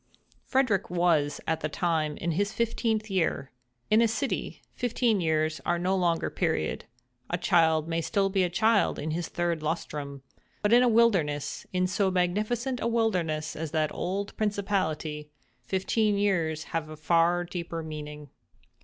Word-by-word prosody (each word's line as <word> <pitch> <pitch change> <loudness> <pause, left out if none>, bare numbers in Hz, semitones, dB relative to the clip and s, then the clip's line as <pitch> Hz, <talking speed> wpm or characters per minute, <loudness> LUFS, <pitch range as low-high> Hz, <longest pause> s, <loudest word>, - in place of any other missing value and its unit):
Frederick 255 -8 +1
was, 170 -5 +2
at 160 0 0
that 155 -1 -4
time, 160 -4 0
in 170 - -2
his 200 +5 0
fifteenth 220 -1 -1
year. 165 -7 0 0.4
In 215 +2 +6
a 230 - +5
city, 265 +5 -3
fifteen 235 -4 +1
years 155 -1 0
are 175 - +1
no 185 +2 0
long 175 -3 +2
period—a - - -3
child 160 -5 +3
may 165 0 -1
be - - -1
still 195 +2 0
a 185 -2 +3
child 220 +4 +2
in 155 +2 -3
his 170 +2 -2
third 175 -2 -1
lustrum: 145 -3 -4 0.4
but 210 +2 +3
in 240 - +7
a 250 - +4
wilderness—in 185 -5 +1
so 190 +2 +1
magnificent 215 +8 0
a - - 0
wilderness 180 -10 0
as 160 0 -4
that 155 -1 0
old 200 +2 -3
principality, 185 -8 -1 0.3
fifteen 205 +2 0
years 170 -6 0
have 160 -2 -2
a 155 - -8
far 170 +3 +2
deeper 170 -2 -5
meaning. 150 -2 -8
175 Hz, 150 wpm, -28 LUFS, 155-205 Hz, 0.4 s, in